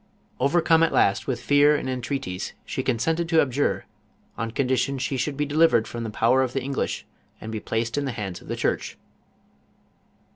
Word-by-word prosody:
Overcome 165 Hz, +4 st, +3 dB
at 165 Hz, -, +3 dB
last 100 Hz, -, +2 dB
with 130 Hz, -3 st, -1 dB
fear 145 Hz, +1 st, +5 dB
and 145 Hz, -, -3 dB
en 130 Hz, -1 st, -2 dB
treaties 115 Hz, -9 st, -4 dB
she -, -, -3 dB
consented 160 Hz, +8 st, 0 dB
to 165 Hz, -1 st, +4 dB
abjure, 140 Hz, 0 st, +1 dB, 0.5 s
on 115 Hz, +1 st, -3 dB
condition 130 Hz, +2 st, 0 dB
she 135 Hz, +1 st, -2 dB
should 140 Hz, +2 st, -2 dB
be 150 Hz, -, 0 dB
delivered 145 Hz, -6 st, +3 dB
from 120 Hz, -1 st, -5 dB
the 115 Hz, -, -3 dB
power 115 Hz, +5 st, +3 dB
of 130 Hz, -1 st, -1 dB
the 135 Hz, -, -2 dB
English 135 Hz, 0 st, -2 dB, 0.3 s
and 110 Hz, -, -7 dB
be 110 Hz, -, -3 dB
placed 115 Hz, +5 st, -2 dB
in 145 Hz, -, -2 dB
the 135 Hz, -, -2 dB
hands 100 Hz, -6 st, -5 dB
of -, -, -15 dB
the -, -, -3 dB
church. -, -, -2 dB
130 Hz, 190 wpm, -25 LUFS, 115-145 Hz, 0.5 s, fear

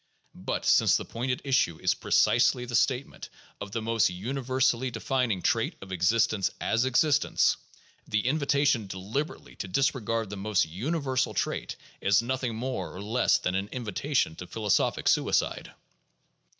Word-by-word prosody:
But -, -, -4 dB
since -, -, +5 dB
the -, -, -6 dB
point 120 Hz, +3 st, -4 dB
at 125 Hz, -, -2 dB
issue 130 Hz, -, +2 dB
is -, -, +2 dB
precisely 125 Hz, -, +2 dB
the 120 Hz, -, -8 dB
statement 130 Hz, +3 st, 0 dB, 0.3 s
of 100 Hz, -, -7 dB
the 115 Hz, +1 st, -3 dB
most 115 Hz, -2 st, +2 dB
universally 130 Hz, +5 st, 0 dB
de 115 Hz, -2 st, -7 dB
fining 125 Hz, -9 st, 0 dB
trait 115 Hz, -2 st, +1 dB
of 95 Hz, -, -11 dB
existence 95 Hz, +3 st, +2 dB
as 115 Hz, +3 st, +1 dB
existence, 140 Hz, +3 st, +3 dB, 0.5 s
the 105 Hz, 0 st, 0 dB
invitation 140 Hz, -4 st, +1 dB
deliberately 100 Hz, +11 st, -5 dB
to -, -, -5 dB
dis 135 Hz, +9 st, +2 dB
regard 115 Hz, -4 st, -3 dB
the 100 Hz, -, -5 dB
most 100 Hz, -2 st, +1 dB
universal 130 Hz, -, -2 dB
trait -, -, -2 dB, 0.3 s
is 100 Hz, 0 st, +4 dB
nothing 125 Hz, -1 st, -2 dB
more 115 Hz, -8 st, -4 dB
or -, -, -7 dB
less 110 Hz, +5 st, +2 dB
than 90 Hz, -, -2 dB
an 95 Hz, +1 st, -1 dB
invi 120 Hz, -5 st, -5 dB
tation 135 Hz, -, 0 dB
to 90 Hz, -, -8 dB
philosophic 105 Hz, -1 st, 0 dB
suicide." -, -, +1 dB
115 Hz, 155 wpm, -28 LUFS, 100-130 Hz, 0.5 s, since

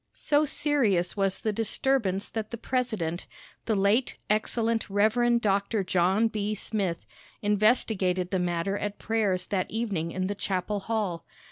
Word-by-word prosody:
So 295 Hz, +1 st, +2 dB
serious 240 Hz, -, +1 dB
was 195 Hz, -2 st, +1 dB
the 215 Hz, -, -2 dB
disturbance 220 Hz, -2 st, 0 dB
that 220 Hz, -1 st, -4 dB
the 235 Hz, -, -5 dB
president, 220 Hz, -10 st, -2 dB, 0.4 s
the 220 Hz, -, +2 dB
late 205 Hz, +6 st, +2 dB
excellent 225 Hz, +1 st, +1 dB
Rev. 230 Hz, +4 st, +3 dB
Dr. 200 Hz, 0 st, +1 dB
John 185 Hz, +4 st, +2 dB
B. 215 Hz, -1 st, -2 dB
Smith, 195 Hz, -5 st, -2 dB, 0.4 s
investigated 205 Hz, -4 st, +2 dB
the 190 Hz, -, +1 dB
matter 180 Hz, +3 st, -1 dB
at 205 Hz, 0 st, -3 dB
prayers 205 Hz, -5 st, 0 dB
that 185 Hz, -2 st, -1 dB
evening 205 Hz, -8 st, -2 dB
in 185 Hz, +1 st, -2 dB
the 200 Hz, -, -1 dB
chapel 200 Hz, 0 st, -2 dB
hall. 200 Hz, -5 st, -2 dB
205 Hz, 140 wpm, -27 LUFS, 185-225 Hz, 0.4 s, Rev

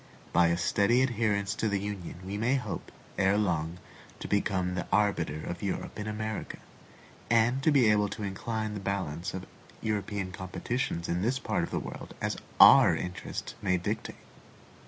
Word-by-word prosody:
By 85 Hz, 0 st, +5 dB
a 85 Hz, 0 st, +2 dB
steady 100 Hz, +7 st, +3 dB
adherence 110 Hz, -4 st, 0 dB
to 110 Hz, -1 st, -1 dB
the 100 Hz, -1 st, 0 dB
Union 100 Hz, -3 st, -5 dB
we 95 Hz, +2 st, -4 dB
may 115 Hz, +6 st, +2 dB
hope, 125 Hz, -7 st, -4 dB, 0.3 s
erelong, 90 Hz, -5 st, +1 dB, 0.4 s
to -, -, -5 dB
become 95 Hz, -3 st, 0 dB
the 90 Hz, -1 st, -3 dB
arbiter 85 Hz, -7 st, +1 dB
of 85 Hz, -, -5 dB
Europe 100 Hz, +2 st, -3 dB
in 105 Hz, -, -4 dB
America, 110 Hz, 0 st, -4 dB, 0.7 s
and 120 Hz, +3 st, +3 dB
to 155 Hz, -, +4 dB
be 135 Hz, -6 st, +5 dB
able 105 Hz, -1 st, +2 dB
to 105 Hz, -, -6 dB
incline 110 Hz, +2 st, -3 dB
the 105 Hz, -, -4 dB
balance 95 Hz, -2 st, -3 dB
of 95 Hz, -, -5 dB, 0.3 s
European 105 Hz, -3 st, -2 dB
competitions 95 Hz, +1 st, -3 dB
in 85 Hz, +1 st, 0 dB
this 120 Hz, +6 st, +1 dB
part -, -, -1 dB
of -, -, -2 dB
the -, -, -2 dB
world -, -, -8 dB
as -, -, -1 dB, 0.2 s
our -, -, +9 dB
interest 90 Hz, +1 st, -5 dB
may 90 Hz, -1 st, +2 dB
dictate. 90 Hz, -, -3 dB
100 Hz, 165 wpm, -29 LUFS, 90-110 Hz, 0.7 s, our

